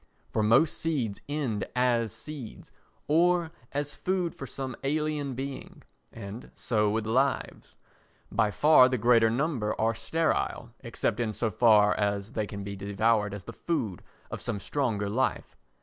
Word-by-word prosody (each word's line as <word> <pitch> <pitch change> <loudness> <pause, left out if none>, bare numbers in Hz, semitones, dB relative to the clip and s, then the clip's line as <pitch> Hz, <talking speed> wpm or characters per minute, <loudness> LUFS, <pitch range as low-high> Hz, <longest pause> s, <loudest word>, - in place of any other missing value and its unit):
For 110 - 0
most 115 +9 +3
seeds 130 -11 -2
end 130 -9 -1
as 120 -3 +2
seeds 140 0 -9 0.4
or 170 +1 +3 0.2
as 145 +1 -2
food 180 -3 -1
for 135 - -8
some 130 -2 -5
alien 150 -1 -1
being, 135 +1 -7 0.3
and 110 +1 -8
so 105 -3 +1
with 110 +1 -1
lives, 130 +5 -1 0.6
by 105 - +2
far 140 +2 +6
the 130 - 0
greater 115 0 +4
number 120 -3 -1
are 115 +1 +2
sterile, 120 0 -1
except 115 -2 -2
in 110 -3 -1
so 110 +1 -1
far 105 -1 +5
as 100 0 -1
they 110 -2 -2
can 100 -1 -6
be 100 0 -5
devoured 105 +2 +1
as 100 - -8
the 115 - -9
food 115 - -2 0.3
of - - -5
some 110 -4 -3
stronger 110 -4 -1
life. 125 +6 -1
115 Hz, 150 wpm, -28 LUFS, 105-140 Hz, 0.6 s, far